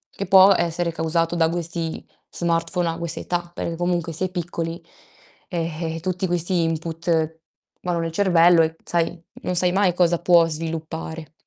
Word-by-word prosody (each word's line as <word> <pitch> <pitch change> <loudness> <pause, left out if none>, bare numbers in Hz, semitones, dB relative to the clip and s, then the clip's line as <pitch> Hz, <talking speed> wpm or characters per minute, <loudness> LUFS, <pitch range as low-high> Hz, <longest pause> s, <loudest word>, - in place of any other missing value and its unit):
che 195 - -4
può 190 0 +7
essere 170 0 0
causato 165 +1 0
da 165 -1 +3
questi 165 -1 -3 0.2
smartphone 170 +1 -1
a 165 - -3
quest' 170 -1 -3
età, 175 -1 -3
perché 170 - -4
comunque 175 -1 -1
si 180 +4 -1
è - - -3
piccoli, 170 -2 -4 0.7
e 165 -1 -3
e, - - -5
tutti 185 +1 -2
questi 175 +1 +1
input 165 0 -1 0.4
vanno 175 -1 -1
nel 165 0 -2
cervello 175 -2 +5
e, 160 0 -2
sai, 170 0 -1 0.2
non 180 - -2
sai 180 0 +3
mai 190 -1 +2
cosa 175 -1 +3
può 170 -1 +5
sviluppare. 160 0 -5
170 Hz, 160 wpm, -22 LUFS, 165-175 Hz, 0.7 s, può